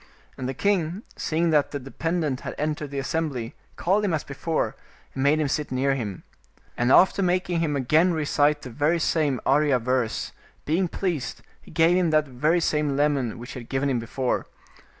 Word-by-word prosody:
And 130 - -4
the 135 - -4
king, 190 - 0
seeing 165 +1 0
that 150 -2 +3
the 145 - -4
dependent 150 +1 -2
had - - -6
entered 150 -1 -2
the 140 - -6
assem 160 +4 -1
bly, 120 -4 -5 0.2
called 195 +4 +1
him 185 -5 +1
as 155 - -3
before, 155 +4 -2 0.4
and 135 - -3
made 145 +3 +3
him 150 - +1
sit 145 +1 -2
near 135 +2 +1
him. 105 -8 -4 0.5
And 120 +1 +1
after 190 +5 +5
making 180 -1 +1
him 155 -3 0
again 155 +7 +3
recite 150 -2 +1
that 125 - -7
very 150 +7 +1
same 155 -5 +1
Arya 145 -1 +3
verse, 125 -1 -1 0.3
being 175 +5 +1
pleased, 170 -6 -3 0.2
he - - -17
gave 165 +2 +3
him 180 -2 +2
that 155 -1 +2
very 150 +7 +1
same 150 -3 0
lemon 140 -6 +1
which 120 +1 -8
he - - -6
had 120 - -12
given 135 +1 0
him 125 - +1
before. 125 +2 -2
150 Hz, 190 wpm, -25 LUFS, 130-165 Hz, 0.5 s, after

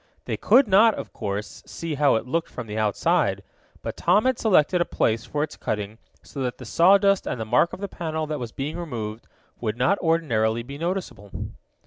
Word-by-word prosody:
They - - -2
could 265 -2 +4
not, 210 +3 +5
of - - -7
course, 100 +1 -5
see 165 -2 -5
how 145 -2 +3
it 110 - -1
looked 165 +6 -2
from 125 - -7
the 105 -1 -7
outside, 110 -2 +1 0.4
but - - -4
Tom 195 +7 +3
had 260 -2 +1
selected 180 -4 +3
a - - +5
place 115 -7 0
for 145 +3 -2
its 150 - -5
cutting 105 +1 -4 0.2
so 140 - -7
that 125 -2 -2
the - - -10
sawdust 195 +2 +4
and - - -3
the 110 - -3
mark 140 +10 +3
of - - -8
the 200 - -2
panel 160 -4 -3
that 150 -1 -4
was 120 -2 -5
being 150 +7 -4
removed, 115 -9 -5 0.3
would 110 -1 -2
not 175 +11 +2
ordinarily 120 -10 +1
be 140 +4 -9
noticeable. 170 - -4
145 Hz, 200 wpm, -24 LUFS, 115-175 Hz, 0.4 s, not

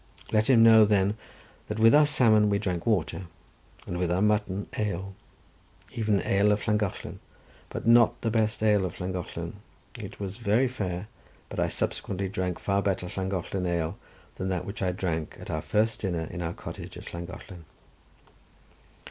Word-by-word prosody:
Let 110 +1 +2
him 115 -4 +7
know, 110 -1 +8
then, 100 -1 +3 0.5
that 105 - -4
with 115 +1 +6
our 150 0 +7
salmon 110 -7 +4
we 100 - +2
drank 90 -3 -3
water, 95 -3 0 0.6
and 90 - -4
with 90 -1 0
our 90 - +2
mutton 105 -2 +1
ale, 95 -2 -2 0.8
even 105 -4 +1
ale 100 +2 +3
of 105 +2 -1
Llangollen; 105 -3 -1 0.5
but - - -6
not 115 0 +5
the 115 - +1
best 110 -1 0
ale 105 -2 +4
of 90 - -4
Llangollen; 90 -1 -5 0.4
it - - -9
was 100 0 -4
very 115 +3 +2
fair; 100 -6 -4 0.4
but - - -5
I - - +2
subsequently 95 0 -2
drank 90 -2 -2
far 100 0 0
better 95 -3 -1
Llangollen 95 -1 -2
ale 85 -2 -1 0.4
than 95 - -2
that 90 -2 -2
which 100 - -6
I 90 -1 +1
drank 85 -4 -3
at - - -7
our 80 - -2
first 110 +5 +1
dinner 85 -5 -2
in 90 - -5
our 85 0 -2
cottage - - -8
at - - -10
Llangollen. 85 +1 -8
100 Hz, 165 wpm, -27 LUFS, 90-110 Hz, 0.8 s, know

